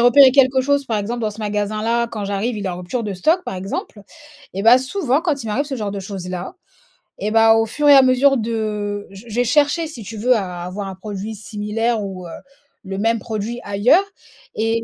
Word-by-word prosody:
repéré 255 Hz, +2 st, +7 dB
quelque 260 Hz, -1 st, +4 dB
chose, 285 Hz, +1 st, +1 dB
par 225 Hz, -4 st, -1 dB
exemple, 235 Hz, +4 st, -3 dB
dans 215 Hz, -1 st, -1 dB
ce 210 Hz, -, -12 dB
magasin-là. 215 Hz, +3 st, -1 dB
Quand 210 Hz, -3 st, -5 dB
j'arrive, 205 Hz, +4 st, -2 dB
il 200 Hz, -, -4 dB
est -, -, 0 dB
en 175 Hz, -, -4 dB
rupture 180 Hz, +7 st, -4 dB
de 205 Hz, -2 st, -3 dB
stock, 320 Hz, -, +2 dB
par -, -, -5 dB
exemple. 195 Hz, +2 st, -5 dB, 0.5 s
Et 195 Hz, -, -3 dB
bah, 230 Hz, +3 st, +8 dB
souvent, 275 Hz, +1 st, 0 dB
quand 295 Hz, -7 st, -1 dB
il -, -, -7 dB
m'arrive 235 Hz, +7 st, 0 dB
ce 275 Hz, -2 st, -4 dB
genre 210 Hz, -4 st, -3 dB
de 200 Hz, -, -4 dB
choses-là, 185 Hz, -, -6 dB, 0.6 s
et 210 Hz, +1 st, -2 dB
bah, 225 Hz, 0 st, +6 dB
au 225 Hz, -, +2 dB
fur 295 Hz, +6 st, -1 dB
et 285 Hz, -, +9 dB
à 270 Hz, -, +9 dB
mesure 265 Hz, +2 st, +4 dB
de 210 Hz, -2 st, -3 dB
j 195 Hz, +3 st, -12 dB
j'ai 235 Hz, +2 st, 0 dB
cherché, 295 Hz, +5 st, +2 dB
si 250 Hz, -8 st, -9 dB
tu 220 Hz, +2 st, -8 dB
veux 250 Hz, +3 st, +3 dB
à 180 Hz, -4 st, -3 dB
avoir 195 Hz, +3 st, -5 dB
un 190 Hz, -, -7 dB
produit 205 Hz, +2 st, -6 dB
similaire 215 Hz, +2 st, -2 dB
ou, 185 Hz, -3 st, -7 dB
heu, 165 Hz, -, -9 dB, 0.5 s
le 195 Hz, 0 st, -5 dB
même 225 Hz, +2 st, +1 dB
produit 220 Hz, +2 st, -4 dB
ailleurs. 205 Hz, -, +3 dB, 0.5 s
Et 225 Hz, +1 st, 0 dB
220 Hz, 220 wpm, -20 LUFS, 200-250 Hz, 0.6 s, et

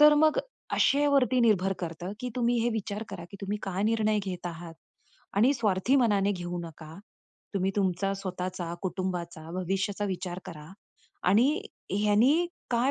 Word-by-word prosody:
तर 300 Hz, 0 st, +9 dB
मग 310 Hz, +8 st, +4 dB, 0.4 s
आशेवरती 275 Hz, -3 st, +4 dB
निर्भर 195 Hz, -4 st, +3 dB
करतं 175 Hz, +2 st, -5 dB
की 250 Hz, -, -3 dB
तुम्ही 240 Hz, 0 st, +2 dB
हे 240 Hz, -, +2 dB
विचार 215 Hz, -1 st, -3 dB
करा 185 Hz, -4 st, -7 dB
की 200 Hz, -, -9 dB
तुम्ही 200 Hz, +1 st, -2 dB
काय 195 Hz, 0 st, -2 dB
निर्णय 215 Hz, -1 st, +2 dB
घेत 180 Hz, -2 st, -4 dB
आहात? 165 Hz, -1 st, -7 dB, 0.6 s
आणि 245 Hz, +7 st, +5 dB
स्वार्थी 220 Hz, +3 st, +2 dB
मनाने 205 Hz, -5 st, +3 dB
घेऊ 175 Hz, -1 st, -4 dB
नका. 160 Hz, -1 st, -10 dB, 0.6 s
तुम्ही 190 Hz, 0 st, +1 dB
तुमचा 195 Hz, 0 st, +1 dB
स्वतःचा, 180 Hz, -2 st, -4 dB
कुटुंबाचा, 180 Hz, -3 st, -3 dB
भविष्याचा 195 Hz, +3 st, -1 dB
विचार 180 Hz, -1 st, -3 dB
करा. 150 Hz, -2 st, -9 dB, 0.6 s
आणि 220 Hz, +7 st, +5 dB, 0.5 s
ह्यांनी 220 Hz, -, +4 dB, 0.2 s
काय 245 Hz, +3 st, +3 dB
195 Hz, 145 wpm, -28 LUFS, 180-230 Hz, 0.6 s, तर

